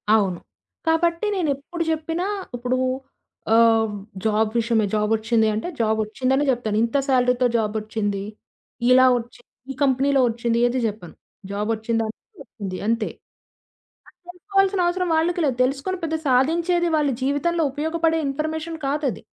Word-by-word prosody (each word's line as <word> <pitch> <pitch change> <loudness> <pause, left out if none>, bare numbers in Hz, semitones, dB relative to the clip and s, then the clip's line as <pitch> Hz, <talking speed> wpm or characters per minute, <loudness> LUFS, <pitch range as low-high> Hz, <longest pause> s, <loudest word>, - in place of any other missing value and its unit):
అవును. 190 -5 +1 0.5
కాబట్టి 335 +3 +2
నేనెప్పుడు 320 0 -2
జెప్పినా 325 +3 -1 0.3
ఇప్పుడు 250 +1 -1 0.8
ఆహ్, 225 -2 +4 0.3
జాబ్ 215 0 +2
విషయమే 225 -2 +1
జాబొచ్చింది 220 +1 +2
అంటే 220 - -3
జాబొచ్చిందనే 225 +5 +1
జెప్తాను. 225 -4 0
ఇంత 235 +4 0
సాలరీ‌తో 250 -1 +3
జాబొచ్చింది 215 -2 -2 0.7
ఇలా 255 0 +7
ఒచ్చి 240 0 -8 0.3
ఈ - - -4
కంపెనీలో 270 0 +3
ఒచ్చింది 230 0 -1
ఏది 245 +2 +1
జెప్పను. 210 -5 -5 0.4
జాబొచ్చిందా 220 +2 -1
అంటే 395 - -14
ఒచ్చింది 200 -6 -7
అంతే. 230 -1 0 1.0
అది - - -21
తెలుసుకోవాల్సినవసరం 370 -1 +1
వాళ్ళకి 345 +2 +1
లేదు. 260 -4 +1
తెలుసుకొని 275 +9 -1
పెద్ద 320 0 -1
సాధించేది 335 +7 +2
వాళ్ళ 295 -2 +2
జీవితంలో 300 +5 +1
ఉపయోగపడే 320 +2 0
ఇన్‌ఫర్‌మేషన్ 315 +3 -3
కాదది. 280 -2 -1
260 Hz, 120 wpm, -23 LUFS, 225-320 Hz, 1.0 s, ఇలా